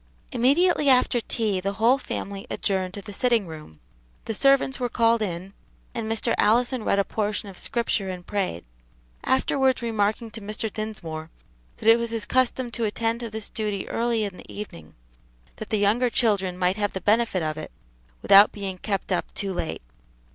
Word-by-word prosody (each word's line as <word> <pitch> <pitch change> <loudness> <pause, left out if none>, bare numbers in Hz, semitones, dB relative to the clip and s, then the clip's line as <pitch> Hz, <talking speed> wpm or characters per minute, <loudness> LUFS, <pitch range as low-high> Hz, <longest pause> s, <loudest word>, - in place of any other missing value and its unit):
Immediately 285 +5 +3
after 250 -2 +4
tea 215 -4 0
the 195 +2 -2
whole 235 +7 +3
family 200 -5 -5
adjourned 190 -2 -1
to 200 - -7
the 205 - -9
sitting 235 -1 +2
room, 155 - -11 0.5
the 225 - -2
servants 275 +3 +3
were 245 -1 -1
called 230 -1 +3
in, 185 -1 -4 0.4
and 225 -2 -3
Mr. 225 - 0
Allison 240 +2 +3
read 200 - +1
a 200 - +4
portion 210 0 -2
of 190 - -11
Scripture 230 -3 -1
and 180 -1 -6
prayed; 190 - -2 0.6
afterwards 265 -1 +2
remarking 220 0 0
to 225 - -8
Mr. 215 +1 -4
Dinsmore 165 -8 -5 0.5
that - - -5
it 225 +1 +7
was 235 0 -2
his 225 -1 -3
custom 255 -1 +1
to 230 0 -1
attend 225 +2 -1
to 235 -1 -5
this 220 0 -5
duty 210 -3 -3
early 230 -1 0
in 200 -3 -4
the - - -12
evening, 85 - -9 0.6
that 215 - -7
the 215 - +1
younger 215 +5 +2
children 200 -7 +1
might 180 +2 +1
have 205 -1 -1
the 190 - -4
benefit 210 -3 +2
of 155 -1 -2
it 155 - -7 0.5
without 200 +1 +8
being 195 -3 -5
kept 195 -1 -3
up 180 - -1
too 195 -2 -2
late. 80 - -4
215 Hz, 180 wpm, -25 LUFS, 195-235 Hz, 0.6 s, without